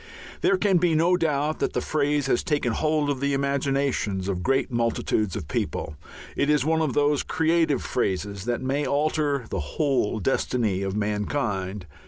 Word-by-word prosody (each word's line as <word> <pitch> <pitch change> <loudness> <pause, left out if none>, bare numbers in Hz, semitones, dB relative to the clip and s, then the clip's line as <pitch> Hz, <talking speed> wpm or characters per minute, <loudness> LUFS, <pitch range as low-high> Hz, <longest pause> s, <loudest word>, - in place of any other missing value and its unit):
There 195 - +3
can 195 -1 +3
be 170 -2 +2
no 170 +3 +4
doubt 155 -3 0
that - - -1
the - - 0
phrase 145 -1 0
has 135 - +2
taken 145 -8 0
hold 155 +2 +1
of 140 -2 -1
the 140 0 0
imaginations 135 -8 0
of 95 -3 -2
great 135 +4 +1
multitudes 115 -4 0
of 75 - -5
people: 75 - -3 0.4
it 145 - +1
is 150 -3 +3
one 160 +1 +2
of 150 -5 0
those 145 -1 +3
creative 160 -4 +1
phrases 100 -3 -2
that 120 +1 -2
may 135 +3 0
alter 145 -2 0
the - - -1
whole 130 - 0
destiny 110 -3 0
of 95 0 -2
mankind. 105 -2 -2
140 Hz, 170 wpm, -25 LUFS, 105-150 Hz, 0.4 s, no